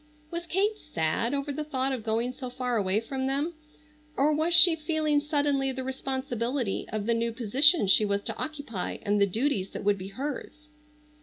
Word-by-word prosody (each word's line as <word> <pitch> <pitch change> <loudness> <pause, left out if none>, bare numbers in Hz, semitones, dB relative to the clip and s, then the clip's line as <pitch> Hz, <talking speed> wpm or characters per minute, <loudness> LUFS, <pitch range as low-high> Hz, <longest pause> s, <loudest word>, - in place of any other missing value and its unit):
Was 340 0 -5
Kate 410 +5 0
sad 165 - -1
over 285 0 -2
the 305 +2 -3
thought 270 -3 -1
of 255 -4 -3
going 230 +3 0
so 255 0 -7
far 250 -1 -2
away 200 -1 +1
from 265 +3 -3
them, 285 +5 -1 0.6
or 295 +3 +3
was 315 +3 +1
she 335 0 +8
feeling 310 -2 0
suddenly 285 -2 0
the 260 0 -4
responsibility 260 -3 -2
of 215 -2 -3
the 235 - +2
new 230 0 0
position 255 - +4
she 195 +2 +5
was 200 -1 0
to - - -3
occupy 285 -11 -4
and 205 0 +1
the 200 - +5
duties 215 -2 -1
that - - -5
would 200 0 +2
be 185 - -6
hers? 290 +6 -6
265 Hz, 185 wpm, -28 LUFS, 225-295 Hz, 0.6 s, she